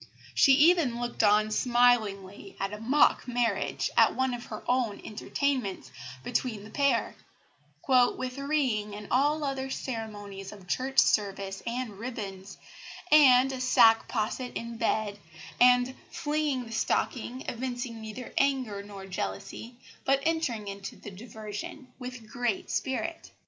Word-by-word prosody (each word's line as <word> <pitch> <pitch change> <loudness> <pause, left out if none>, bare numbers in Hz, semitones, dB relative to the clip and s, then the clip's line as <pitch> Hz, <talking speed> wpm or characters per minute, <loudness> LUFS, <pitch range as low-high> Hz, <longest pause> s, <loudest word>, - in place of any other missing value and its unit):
She 275 - +6
even 295 -4 +4
looked 240 0 -2
on 215 0 +4
smilingly 215 -5 +1
at 195 +1 -2
a 210 - -6
mock 260 +4 +3
marriage, 235 -5 0
at - - +5
one 260 -1 0
of 245 0 -6
her 215 - -7
own 245 -5 +1
entertainments, 220 - -2 0.3
between 235 -4 -2
the 215 - -12
pair 280 -6 +1 0.7
"with 255 0 +2
ring 260 -8 0
and 210 0 -8
all 290 +4 +2
other 270 -1 -2
ceremonies 205 -6 -6
of 195 -3 -13
church 265 +7 -2
service 195 -2 +2
and 235 -4 -4
ribands, 200 -5 -6 0.5
and 270 -3 +7
a 260 -1 -5
sack 225 -3 +5
posset 245 +2 -2
in 230 0 -6
bed, 215 -2 -1 0.4
and 250 +1 +5 0.2
flinging 295 -4 -1
the 225 - -11
stocking, 245 +3 -1
evincing 245 -2 -4
neither 220 +3 -8
anger 260 -7 0
nor 200 -1 -10
jealousy, 200 +5 -5 0.3
but 275 0 +3
entering 310 -11 -1
into 200 0 -6
the 205 - -10
diversion 215 +5 -8
with 250 -3 -8
great 240 -2 -2
spirit." 260 +10 -3
240 Hz, 135 wpm, -28 LUFS, 210-260 Hz, 0.7 s, and